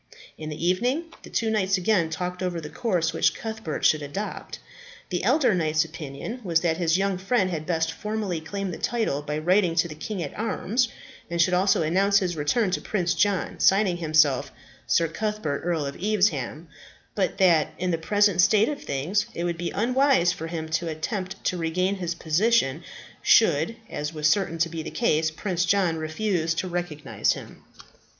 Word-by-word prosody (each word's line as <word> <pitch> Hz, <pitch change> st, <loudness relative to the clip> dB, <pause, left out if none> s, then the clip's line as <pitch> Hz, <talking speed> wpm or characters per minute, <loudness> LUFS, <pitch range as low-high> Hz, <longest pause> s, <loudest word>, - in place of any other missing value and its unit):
In 155 Hz, -1 st, -7 dB
the 155 Hz, +3 st, -3 dB
evening, 250 Hz, -, 0 dB
the -, -, -12 dB
two 225 Hz, -1 st, 0 dB
knights 195 Hz, -2 st, +1 dB
again 180 Hz, -3 st, +2 dB
talked 180 Hz, +3 st, -4 dB
over 180 Hz, -2 st, -2 dB
the 150 Hz, -2 st, -8 dB
course 180 Hz, -9 st, 0 dB
which -, -, +2 dB
Cuthbert 220 Hz, -8 st, -4 dB
should 155 Hz, -, +4 dB
adopt. 150 Hz, +9 st, -5 dB, 0.5 s
The 180 Hz, -2 st, -2 dB
elder 255 Hz, +2 st, +3 dB
knight's 155 Hz, -3 st, +1 dB
opinion 160 Hz, -, -7 dB
was 165 Hz, -4 st, +2 dB
that 160 Hz, -2 st, +1 dB
his 170 Hz, -1 st, +2 dB
young 195 Hz, -1 st, 0 dB
friend 190 Hz, -1 st, +1 dB
had 155 Hz, -2 st, -4 dB
best 165 Hz, -2 st, 0 dB
formally 210 Hz, -3 st, -3 dB
claim 195 Hz, +4 st, -4 dB
the -, -, -7 dB
title 220 Hz, -12 st, -1 dB
by 150 Hz, +1 st, -3 dB
writing 175 Hz, +2 st, +2 dB
to 165 Hz, +1 st, +2 dB
the 155 Hz, -, -8 dB
king 175 Hz, +4 st, -5 dB
at 145 Hz, -, -7 dB
arms, 230 Hz, +2 st, 0 dB, 0.4 s
and 170 Hz, 0 st, -3 dB
should 180 Hz, +2 st, +3 dB
also 185 Hz, -1 st, +3 dB
announce 195 Hz, +5 st, +3 dB
his 180 Hz, -3 st, 0 dB
return 185 Hz, +8 st, +1 dB
to -, -, -1 dB
Prince 180 Hz, -4 st, 0 dB
John, 200 Hz, -3 st, 0 dB
signing 195 Hz, -2 st, +3 dB
himself 155 Hz, -5 st, +2 dB, 0.4 s
"Sir 170 Hz, -, +3 dB
Cuthbert, 210 Hz, -4 st, -3 dB
Earl 165 Hz, -4 st, -1 dB
of 140 Hz, -, -5 dB
Evesham;" 175 Hz, -, 0 dB, 0.5 s
but 195 Hz, -3 st, -1 dB
that, 170 Hz, -5 st, +4 dB
in 180 Hz, 0 st, -1 dB
the 165 Hz, -, -1 dB
present 205 Hz, +1 st, +3 dB
state 210 Hz, +3 st, +4 dB
of 290 Hz, -1 st, -5 dB
things, 170 Hz, +10 st, -1 dB
it 170 Hz, -, -3 dB
would 175 Hz, -1 st, -1 dB
be 170 Hz, +1 st, -3 dB
unwise 250 Hz, -5 st, +2 dB
for 165 Hz, -2 st, -6 dB
him 160 Hz, -1 st, -4 dB
to 165 Hz, +2 st, -1 dB
attempt 185 Hz, +4 st, -4 dB
to 180 Hz, -, 0 dB
regain 180 Hz, +4 st, 0 dB
his 175 Hz, -2 st, -3 dB
position, 170 Hz, -, +1 dB, 0.4 s
should, 160 Hz, +10 st, +4 dB
as 150 Hz, -6 st, -5 dB
was 155 Hz, 0 st, +1 dB
certain 165 Hz, +1 st, +1 dB
to 165 Hz, +1 st, +2 dB
be 165 Hz, 0 st, -5 dB
the -, -, -6 dB
case, 160 Hz, -9 st, +1 dB
Prince 180 Hz, +2 st, -2 dB
John 180 Hz, -3 st, +2 dB
refuse 160 Hz, +1 st, -1 dB
to 185 Hz, -, -2 dB
recognize 175 Hz, -5 st, -1 dB
him. -, -, -11 dB
175 Hz, 185 wpm, -25 LUFS, 160-200 Hz, 0.5 s, should